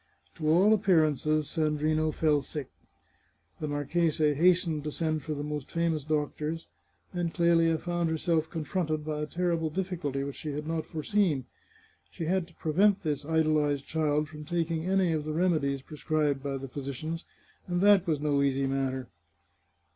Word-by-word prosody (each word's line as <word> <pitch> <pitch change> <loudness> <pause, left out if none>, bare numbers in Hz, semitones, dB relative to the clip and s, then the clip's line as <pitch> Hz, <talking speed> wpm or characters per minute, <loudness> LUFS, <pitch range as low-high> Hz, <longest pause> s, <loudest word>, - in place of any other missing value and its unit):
To 155 -3 -2
all 190 +7 +6
appearances 155 - +2
Sandrino 155 +1 +1
fell 150 -2 +2
sick. 140 0 -6 0.9
The 155 - -3
marchese 150 +1 +1
hastened 170 -1 +3
to 150 - -2
send 155 0 -1
for 155 +2 -4
the 145 - -4
most 150 -2 -4
famous 165 -3 0
doctors, 155 +2 -2 0.5
and 175 -2 -1
Clelia 165 -2 +3
found 175 0 -1
herself 160 0 0
confronted 155 -1 -2
by 150 -1 -2
a 150 - -2
terrible 170 -1 0
difficulty 160 -6 -2
which 140 0 -5
she 150 -2 -5
had 150 +1 -4
not 160 0 -2
foreseen. 160 - 0 0.6
She 125 - -5
had 180 +1 0
to 170 - -20
prevent 195 +6 +2
this 150 -3 -2
idolized 155 -3 +2
child 150 -1 0
from 150 0 -9
taking 165 0 -1
any 190 -3 +2
of 155 -1 -1
the 155 0 -3
remedies 155 -6 +1
prescribed 150 -2 -1
by 140 -1 -3
the 135 0 -6
phy 140 +3 -6
sicians, 155 +5 -4 0.4
and 175 -1 0
that 200 -2 +5
was 155 -3 +1
no 145 -1 +1
easy 135 -1 +1
matter. 135 -1 -1
155 Hz, 160 wpm, -29 LUFS, 145-170 Hz, 0.9 s, all